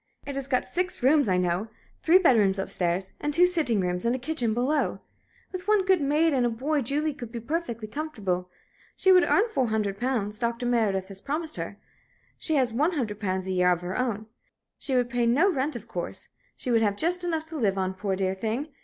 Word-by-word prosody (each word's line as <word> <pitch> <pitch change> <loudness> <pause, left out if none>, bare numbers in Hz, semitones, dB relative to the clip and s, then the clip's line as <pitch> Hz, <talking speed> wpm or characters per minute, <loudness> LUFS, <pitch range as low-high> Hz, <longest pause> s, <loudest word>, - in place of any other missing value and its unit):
It 280 - -5
has 275 -1 -4
got 255 -2 +1
six 365 -6 -2
rooms, 285 0 +4
I 185 - +3
know 180 +3 0 0.3
three 335 +3 +6
bedrooms 220 - +4
up 195 - -3
stairs, 180 +2 -1
and 295 - -1
two 345 +4 +5
sitting 320 - +1
rooms 180 -1 -1
and 235 +2 +1
a - - -1
kitchen 255 -3 -1
below. 260 +6 0 0.5
With 370 0 -6
one 420 -3 +3
good 375 -3 +3
maid 300 +3 +2
and 255 -2 +2
a 240 - +2
boy 280 +6 -1
Julie 295 +5 0
could 240 -5 -9
be 235 - -5
perfectly 235 -4 -3
comfortable. 210 - -3 0.5
She 380 - +3
would 365 -1 +7
earn 420 +4 +4
four 265 - 0
hundred 210 -3 -1
pounds 220 -5 -1
Dr. 235 0 -1
Meredith 210 -6 +1
has 195 -1 -9
promised 310 +2 -3
her - - -5 0.6
she 315 - -2
has 255 -5 +2
one 300 +9 +1
hundred 220 -9 -3
pounds 190 -2 -2
a 190 - -3
year 180 -1 +3
of 175 -1 0
her 180 +1 -4
own. 225 -4 -1 0.5
She 265 - -2
would 245 -1 +2
pay 240 0 0
no 305 +12 +4
rent, 285 -1 -1
of 235 -1 -8
course. 175 -5 -6 0.3
She 250 - -4
would 230 -1 +4
have 205 -2 +1
just 355 +5 0
enough 325 -3 -1
to 325 - -8
live 200 -5 +1
on, 190 0 -1
poor, 190 0 -2
dear 190 0 0
thing! 225 +9 -3
245 Hz, 225 wpm, -26 LUFS, 200-305 Hz, 0.6 s, would